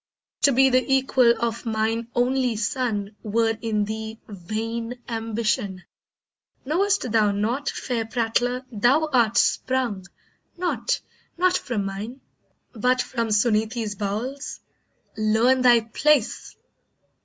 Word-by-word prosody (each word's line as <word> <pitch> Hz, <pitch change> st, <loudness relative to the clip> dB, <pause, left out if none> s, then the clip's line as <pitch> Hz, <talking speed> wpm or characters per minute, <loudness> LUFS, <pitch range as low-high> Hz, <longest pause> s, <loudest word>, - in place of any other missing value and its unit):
To 280 Hz, -, +5 dB
be 265 Hz, +1 st, +4 dB
the 255 Hz, 0 st, +4 dB
equal 260 Hz, -3 st, +4 dB
of 235 Hz, -1 st, -2 dB
mine 225 Hz, 0 st, -1 dB
only 250 Hz, -1 st, +1 dB
son 215 Hz, -2 st, -2 dB
Were 225 Hz, +1 st, +1 dB
in 215 Hz, -2 st, 0 dB
thee 220 Hz, +1 st, -6 dB
vain 225 Hz, +5 st, -5 dB
ambition. 220 Hz, -4 st, -2 dB, 0.8 s
Know'st 370 Hz, -, +1 dB
thou 215 Hz, -2 st, +3 dB
not, 225 Hz, +8 st, -1 dB
Fair 240 Hz, -3 st, -2 dB
prattler, 245 Hz, +2 st, -1 dB
thou 245 Hz, +8 st, +2 dB
art 235 Hz, -3 st, +3 dB
sprung, 240 Hz, -8 st, +1 dB, 0.5 s
not, 355 Hz, 0 st, -1 dB, 0.4 s
not 365 Hz, +1 st, +3 dB
from 230 Hz, -, -2 dB
mine, 205 Hz, +7 st, -6 dB, 0.5 s
But 250 Hz, +2 st, +1 dB
from 235 Hz, -2 st, -1 dB
Suneetee's 215 Hz, 0 st, +1 dB
bowels? 220 Hz, +8 st, -4 dB, 0.5 s
Learn 220 Hz, +4 st, +3 dB
thy 240 Hz, -2 st, +6 dB
place." 250 Hz, +3 st, +1 dB
230 Hz, 110 wpm, -24 LUFS, 215-255 Hz, 0.8 s, thy